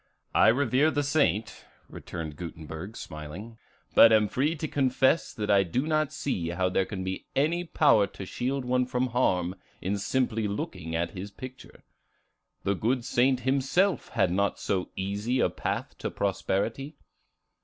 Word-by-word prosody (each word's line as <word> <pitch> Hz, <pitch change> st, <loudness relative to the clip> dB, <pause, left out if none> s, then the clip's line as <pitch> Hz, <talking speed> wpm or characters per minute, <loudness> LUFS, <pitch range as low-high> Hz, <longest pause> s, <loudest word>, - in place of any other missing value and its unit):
"I -, -, +5 dB
revere 140 Hz, +5 st, +3 dB
the 145 Hz, -2 st, 0 dB
saint," 140 Hz, -7 st, 0 dB, 0.2 s
returned 80 Hz, -3 st, -7 dB
Gutenberg, 85 Hz, +5 st, -7 dB
smiling, 90 Hz, +9 st, -8 dB, 0.3 s
"but 115 Hz, -, +8 dB
am 110 Hz, -1 st, +5 dB
free 145 Hz, -, 0 dB
to 155 Hz, 0 st, -3 dB
confess 135 Hz, +2 st, +2 dB
that 105 Hz, -2 st, -2 dB
I 100 Hz, -1 st, +6 dB
do 100 Hz, -, -1 dB
not 155 Hz, -2 st, +1 dB
see 90 Hz, -12 st, -2 dB
how 90 Hz, +1 st, 0 dB
there 95 Hz, +1 st, +1 dB
can 95 Hz, -3 st, -4 dB
be 95 Hz, 0 st, -5 dB
any 165 Hz, +5 st, +2 dB
power 130 Hz, -11 st, +4 dB
to 95 Hz, -, -9 dB
shield 130 Hz, +6 st, -2 dB
one 125 Hz, 0 st, +1 dB
from 125 Hz, 0 st, 0 dB
harm 90 Hz, -8 st, +1 dB, 0.3 s
in 100 Hz, +2 st, -2 dB
simply 115 Hz, -1 st, 0 dB
looking 90 Hz, -5 st, -4 dB
at 85 Hz, +1 st, -1 dB
his 95 Hz, +1 st, -7 dB
picture. 130 Hz, +5 st, -11 dB, 0.8 s
The 100 Hz, -, +1 dB
good 120 Hz, +5 st, 0 dB
saint 125 Hz, +1 st, +2 dB
himself 140 Hz, +9 st, +1 dB
had 90 Hz, -, +1 dB
not 100 Hz, +2 st, +1 dB
so 95 Hz, -2 st, -1 dB
easy 105 Hz, +6 st, -1 dB
a -, -, +2 dB
path -, -, -3 dB
to -, -, -2 dB
prosperity." 110 Hz, +8 st, -2 dB
110 Hz, 155 wpm, -28 LUFS, 95-130 Hz, 0.8 s, but